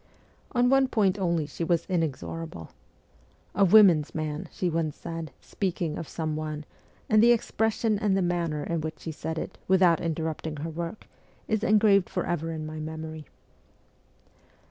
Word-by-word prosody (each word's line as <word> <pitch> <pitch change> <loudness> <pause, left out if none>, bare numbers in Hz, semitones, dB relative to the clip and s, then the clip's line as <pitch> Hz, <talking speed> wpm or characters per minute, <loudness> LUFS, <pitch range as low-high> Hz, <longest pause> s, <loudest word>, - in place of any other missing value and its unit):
On 245 -1 +3
one 270 -1 +5
point 205 -5 +1
only 170 -4 +1
she 150 +3 -5
was 170 0 +1
inexorable. 165 - -3 0.4
' - - -33
A 200 - +3
women's 180 -6 +6
man,' 155 -1 -3
she 185 - -2
once 160 -3 -1
said, 165 -2 -6
speaking 180 -5 -3
of 165 - -6
some 155 -2 -3
one, 155 -1 -4 0.4
and 215 -1 +5
the 235 +1 +7
expression 220 -2 +1
and 205 -3 +2
the 190 - +1
manner 170 -4 -1
in 170 0 -2
which 155 0 -5
she 165 - -5
said 160 +1 -5
it, - - -5
without 180 -3 +4
interrupt 160 -1 -2
ing 155 - -4
her 155 +3 -5
work, 170 +5 -5 0.4
is 220 -1 0
engraved 210 -4 +4
for - - -2
ever 165 -1 -2
in 155 -1 -5
my 155 0 -6
memory. 155 -1 -6
165 Hz, 165 wpm, -27 LUFS, 155-195 Hz, 0.4 s, the